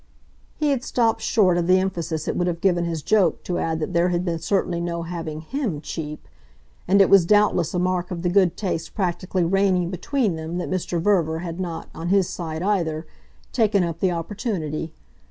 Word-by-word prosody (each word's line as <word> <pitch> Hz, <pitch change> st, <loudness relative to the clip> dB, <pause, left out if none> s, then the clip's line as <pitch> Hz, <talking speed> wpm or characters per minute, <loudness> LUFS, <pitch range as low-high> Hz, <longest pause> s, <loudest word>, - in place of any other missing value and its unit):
He 300 Hz, -2 st, +1 dB
had 260 Hz, -3 st, 0 dB
stopped 230 Hz, -4 st, +1 dB
short 185 Hz, -6 st, +3 dB
of 170 Hz, -, -1 dB
the 185 Hz, +1 st, +6 dB
emphasis 170 Hz, -4 st, -2 dB
it -, -, -1 dB
would 175 Hz, -, 0 dB
have 170 Hz, -1 st, -2 dB
given 175 Hz, -2 st, +2 dB
his 165 Hz, -3 st, -3 dB
joke 190 Hz, -5 st, +2 dB
to 180 Hz, -, -2 dB
add 160 Hz, -1 st, -1 dB
that 155 Hz, -, -3 dB
there 170 Hz, +1 st, +3 dB
had 175 Hz, 0 st, -1 dB
been 170 Hz, -2 st, -1 dB
certainly 175 Hz, -1 st, 0 dB
no 170 Hz, -1 st, -3 dB
having 165 Hz, -2 st, -5 dB
HIM 220 Hz, -, -3 dB
cheap; 150 Hz, 0 st, -6 dB, 0.6 s
and 200 Hz, +2 st, +4 dB
it 195 Hz, -, +7 dB
was 195 Hz, -3 st, +6 dB
doubtless 185 Hz, -3 st, +3 dB
a -, -, +1 dB
mark 180 Hz, 0 st, 0 dB
of 175 Hz, -2 st, -5 dB
the 175 Hz, -, +2 dB
good 185 Hz, -2 st, +3 dB
taste 180 Hz, -5 st, -3 dB
practically 185 Hz, -2 st, -1 dB
reigning 185 Hz, 0 st, +2 dB
between 200 Hz, -, -1 dB
them 160 Hz, +2 st, -5 dB
that 180 Hz, -, -3 dB
Mr. 180 Hz, -2 st, -1 dB
Verver 165 Hz, -3 st, +1 dB
had 170 Hz, +1 st, -5 dB
not, 170 Hz, -3 st, -4 dB
on 165 Hz, -, -5 dB
his 195 Hz, -2 st, +3 dB
side 160 Hz, -1 st, -5 dB
either, 170 Hz, -6 st, 0 dB, 0.5 s
taken 215 Hz, -5 st, +3 dB
up 170 Hz, -1 st, -3 dB
the 190 Hz, -, +2 dB
opportunity. 165 Hz, -, -3 dB
175 Hz, 200 wpm, -23 LUFS, 165-195 Hz, 0.6 s, it